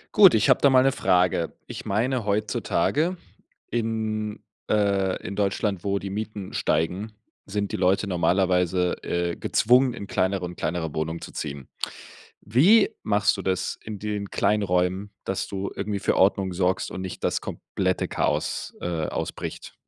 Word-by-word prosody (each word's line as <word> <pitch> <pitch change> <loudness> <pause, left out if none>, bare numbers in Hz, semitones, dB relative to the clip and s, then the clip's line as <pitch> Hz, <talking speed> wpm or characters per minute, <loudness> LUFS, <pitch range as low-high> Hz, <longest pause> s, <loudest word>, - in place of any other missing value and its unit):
Gut, 195 - +8
ich 110 - +3
habe - - +3
da 140 - +6
mal 130 -1 +6
'ne 135 - +4
Frage. 90 -8 +2
Ich - - -8
meine, 120 +5 0
heutzutage 110 - 0 0.5
in, 110 -2 -2 0.3
äh, 100 -3 +2
in 100 - -4
Deutschland, 100 -1 0
wo 100 0 0
die 100 0 -5
Mieten 105 -1 -5
steigen, 95 +2 0 0.3
sind 100 0 -2
die - - -2
Leute 95 +3 +2
normalerweise, 90 0 +2
äh, 85 0 -1
gezwungen, 125 +2 +3
in 100 - -6
kleineren 95 -2 -1
in - - -12
kleinere 80 -2 -2
Wohnungen 80 +2 -2
zu - - -9
ziehen. 70 -3 -6 0.8
Wie 175 - +5
machst 105 0 +2
du - - -2
das 95 0 -1
in 105 -2 -6
den 105 -1 -3
kleinen 105 +2 +1
Räumen, 90 +2 0
dass 95 - -2
du 100 0 -3
irgendwie 100 0 -2
für - - +1
Ordnung 95 0 +3
sorgst 90 +1 0
und - - -6
nicht 95 -1 -6
das - - +1
komplette - - -2
Chaos, - - -1
äh, 85 -3 -1
ausbricht? - - -5
100 Hz, 155 wpm, -25 LUFS, 90-110 Hz, 0.8 s, Gut